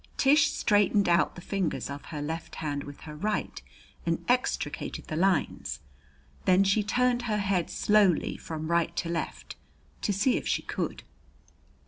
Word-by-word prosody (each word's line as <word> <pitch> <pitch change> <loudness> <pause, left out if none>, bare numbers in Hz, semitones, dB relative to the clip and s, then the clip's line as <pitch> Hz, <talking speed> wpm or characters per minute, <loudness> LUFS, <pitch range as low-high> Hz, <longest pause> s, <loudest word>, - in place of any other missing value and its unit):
Tish 295 +2 +5
straightened 205 -1 +3
out 170 0 +3
the 175 - -9
fingers 190 -2 -2
of 140 0 -7
her 150 -3 -5
left 160 +2 -5
hand 145 -2 -3
with 145 0 -10
her 150 -1 -8
right 210 +7 -2 0.4
and 165 -1 -1
extricated 250 +1 -1
the 155 - -5
lines. 185 -1 0 0.7
Then 185 +1 +5
she 195 +2 +3
turned 245 +3 +1
her 210 - +1
head 195 -4 0
slowly 205 -5 +3
from 160 0 -5
right 170 -1 +1
to 170 - -2
left 170 -1 -4 0.4
to - - 0
see 205 +6 +2
if - - -4
she - - 0
could. - - -4
185 Hz, 155 wpm, -28 LUFS, 160-210 Hz, 0.7 s, Tish